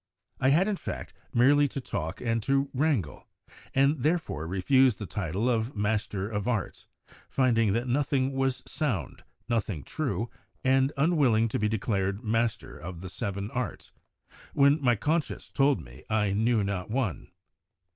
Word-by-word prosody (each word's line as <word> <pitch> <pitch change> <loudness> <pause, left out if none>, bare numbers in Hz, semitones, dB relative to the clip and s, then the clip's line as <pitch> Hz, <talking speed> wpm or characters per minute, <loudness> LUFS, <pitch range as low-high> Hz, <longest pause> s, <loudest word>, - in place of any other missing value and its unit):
I 130 - +3
had, 170 +8 +4
in 210 -2 0
fact, - - -6 0.2
merely 145 +4 +5
to 140 - -5
talk 80 - -4
and 115 -2 0
to 135 +4 +1
wrangle, 135 - 0 0.5
and 140 +1 +3
therefore 155 - 0
refused 115 +6 +3
the 105 - -5
title 95 +3 -2
of 115 0 0
Master 105 -1 -1
of 105 0 -3
Arts, 115 -6 -2 0.4
finding 115 -6 +2
that 120 +3 -1
nothing 135 0 +1
was 135 -1 0
sound, 115 - -3 0.2
nothing 105 - -1
true, 130 -6 -2 0.4
and 135 +1 +3
unwilling 135 -8 +3
to - - -1
be 105 0 +1
declared 100 -1 -1
master 115 +1 -1
of 85 0 -8
the 95 - -6
seven 100 +3 -4
arts, 125 -2 -4 0.6
when 140 +2 +5
my 120 -3 +4
conscience 155 +8 -2
told 140 0 +3
me - - -14
I 105 -2 +2
knew 110 +1 +2
not 100 -1 -3
one. 115 -6 -2
115 Hz, 150 wpm, -28 LUFS, 100-135 Hz, 0.6 s, merely